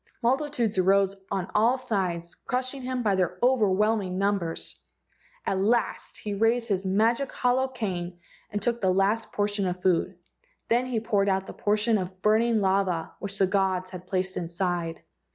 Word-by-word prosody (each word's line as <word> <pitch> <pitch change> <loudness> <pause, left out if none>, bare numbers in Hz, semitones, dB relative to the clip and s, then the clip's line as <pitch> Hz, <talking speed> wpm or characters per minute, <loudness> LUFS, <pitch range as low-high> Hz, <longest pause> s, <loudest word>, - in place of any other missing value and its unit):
Multitudes 245 -5 +1
arose 195 +1 +3
on 190 -2 -3
all 230 +5 +4
sides, 180 -8 -2
crushing 255 +2 -3
him 255 -1 -2
by 205 -3 +2
their 180 -1 0
overwhelming 210 -5 +2
numbers. 195 -4 -1 0.6
At 190 - 0
last 230 +4 0
he 210 - -4
raised 225 +3 +1
his 195 -2 0
magic 225 +7 +1
hollow 255 +1 +1
cane 185 -9 -4 0.3
and 205 - -2
took 235 +3 -1
the 190 - +2
last 195 +4 +1
portion 205 -1 0
of 180 0 -4
food. 185 0 +1 0.5
Then 245 +2 +2
he 245 -3 0
poured 205 -3 +1
out 190 0 +1
the - - -8
portion 210 +1 +1
of 185 0 -6
burning 220 +1 +3
lava 190 -4 +1
which 200 -1 -5
the 195 - +4
gods 185 -1 0
had 180 -1 -9
placed 185 0 -1
inside. 170 -1 -2
200 Hz, 160 wpm, -27 LUFS, 185-230 Hz, 0.6 s, all